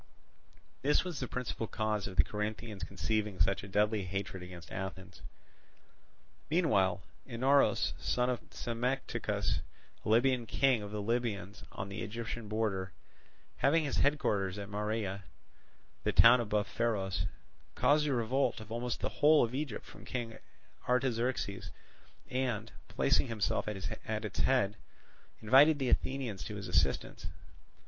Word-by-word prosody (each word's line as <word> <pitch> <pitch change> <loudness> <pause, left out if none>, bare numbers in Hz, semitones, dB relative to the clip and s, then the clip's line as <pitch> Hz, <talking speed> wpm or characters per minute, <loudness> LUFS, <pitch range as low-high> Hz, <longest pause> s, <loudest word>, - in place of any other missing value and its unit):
This 145 +3 +3
was 180 -4 -5
the 125 - -3
principal 120 -2 -3
cause 105 -2 -1
of 95 - -7
the - - +6
Corinthians 105 -1 -4
conceiving 100 +3 -2
such 95 0 +2
a 100 - -9
deadly 105 +2 +2
hatred 95 0 -4
against 90 -1 -10
Athens. 95 -1 -6 1.3
Meanwhile 100 - +2 0.2
Inaros, 135 +3 +3
son 125 0 +1
of 125 -2 0
Psammetichus, 125 +3 -1 0.4
a - - -3
Libyan 120 +1 +3
king 130 -3 +3
of 105 - -6
the 105 0 -4
Libyans 105 -4 -2
on 95 - -5
the 100 +3 -6
Egyptian 115 0 -5
border, 100 -4 -1 0.6
having 160 +4 +3
his 145 - -2
headquarters 105 -10 +1
at 100 -1 -6
Marea, 105 -1 -2 0.8
the - - +1
town 120 +1 +8
above 105 -2 0
Pharos, 100 -5 -1 0.5
caused 145 +4 +3
a 140 - +1
revolt 120 +3 +1
of 110 0 -11
almost 120 +1 -3
the - - -1
whole 150 +1 +7
of 115 0 -2
Egypt 140 -4 -3
from - - -13
King 115 -3 -5 0.5
Artaxerxes 125 -5 0 0.6
and, 125 -4 -2 0.2
placing - - +2
himself 110 -3 -1
at 105 -2 -3 0.5
its 105 - -5
head, 120 -6 +2 0.7
invited 140 +7 +7
the 135 -3 -1
Athenians 125 -9 -1
to 105 - -5
his 100 -1 -6
assistance. 90 - 0
110 Hz, 135 wpm, -32 LUFS, 100-125 Hz, 1.3 s, town